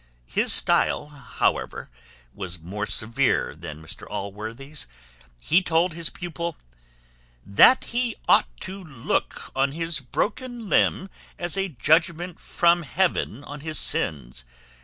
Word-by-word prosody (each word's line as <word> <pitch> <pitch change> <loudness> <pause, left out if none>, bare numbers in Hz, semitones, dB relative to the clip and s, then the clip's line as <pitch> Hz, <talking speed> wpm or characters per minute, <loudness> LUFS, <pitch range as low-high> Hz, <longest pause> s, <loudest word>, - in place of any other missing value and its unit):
His - - +1
stile, 145 - +3
however, 145 -4 -2 0.5
was 90 -3 -6
more 100 +6 -4
severe 115 - +1
than 80 -1 -9
Mr 80 - -9
Allworthy's: 110 +9 -6 0.5
he 165 - +3
told 170 0 +2
his 165 0 -2
pupil, 170 -2 -5 0.9
"That 100 - +6
he 240 -1 -1
ought - - +6
to 190 +1 -6
look 135 -9 -2
on 135 +1 +2
his 165 0 -1
broken 235 - -3
limb 190 0 +2 0.3
as 175 0 -1
a 195 0 0
judgment 165 +5 +1
from 175 0 +3
heaven 160 - 0
on 145 +1 -8
his 155 +1 -4
sins. 60 -5 0
155 Hz, 120 wpm, -25 LUFS, 110-175 Hz, 0.9 s, That